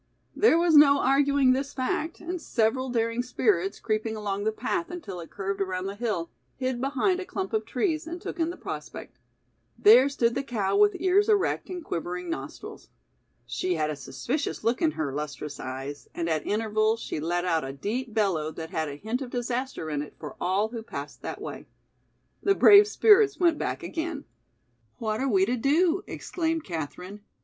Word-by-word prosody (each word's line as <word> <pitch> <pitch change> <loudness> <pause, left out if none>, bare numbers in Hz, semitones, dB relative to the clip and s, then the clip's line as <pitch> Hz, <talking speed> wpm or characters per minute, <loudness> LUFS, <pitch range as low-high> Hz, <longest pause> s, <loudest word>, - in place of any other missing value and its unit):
There 415 -6 +5
was 340 -1 +3
no 285 -1 +8
arguing 275 -1 +4
this 275 +2 -3
fact, 295 +5 -2
and 350 0 -5
several 255 +1 0
daring 230 0 0
spirits, 210 -6 0
creeping 220 0 -1
along 205 -1 -3
the 220 - +2
path 335 +10 -2
until 310 - -7
it 165 - -9
curved 195 0 -4
around 185 -1 -2
the 195 - -3
hill, 205 -6 -3 0.2
hid 255 -1 -2
behind 285 +8 +1
a - - -3
clump 385 +2 -4
of 435 - 0
trees 325 -4 -1
and 345 +2 -5
took 345 - -7
in 325 0 +1
the 350 - -6
prospect. - - -8 0.6
There 280 -10 +7
stood 235 -4 +1
the - - -1
cow 210 -7 -1
with 205 0 +5
ears 380 +4 +3
erect 415 -2 +1
and 355 -3 -6
quivering 175 +1 -4
nostrils. 135 -2 -7 0.6
She 180 +9 -1
had 155 -1 0
a - - -4
suspicious 275 - -3
look 230 +2 +1
in 320 -2 +2
her 145 -4 -3
lustrous 150 0 -5
eyes 135 +2 -6
and 170 - -2
at 160 -2 -1
intervals 215 +1 +1
she 155 - -4
let 175 +3 -1
out 165 -3 +1
a 135 - -4
deep 220 - -4
bellow 195 -8 +1
that 160 0 -7
had 160 -4 -1
a 140 - -6
hint 220 - -3
of 260 - -5
disaster 245 -5 -3
in 145 -1 -1
it 150 - -9
for 150 -3 -8
all 200 +4 +1
who 230 -1 -6
passed 145 -9 -8
that - - -5
way. - - -7 0.7
The 395 0 +3
brave 410 +1 +8
spirits 425 -1 +5
went 340 -4 +3
back - - -3
again. 320 -3 -4 0.7
"What 220 0 -2
are 270 - +1
we 195 -4 +4
to 245 +4 -1
do?" 330 - +2
exclaimed 325 -2 -2
Katherine. 180 +4 -6
230 Hz, 190 wpm, -27 LUFS, 180-305 Hz, 0.7 s, no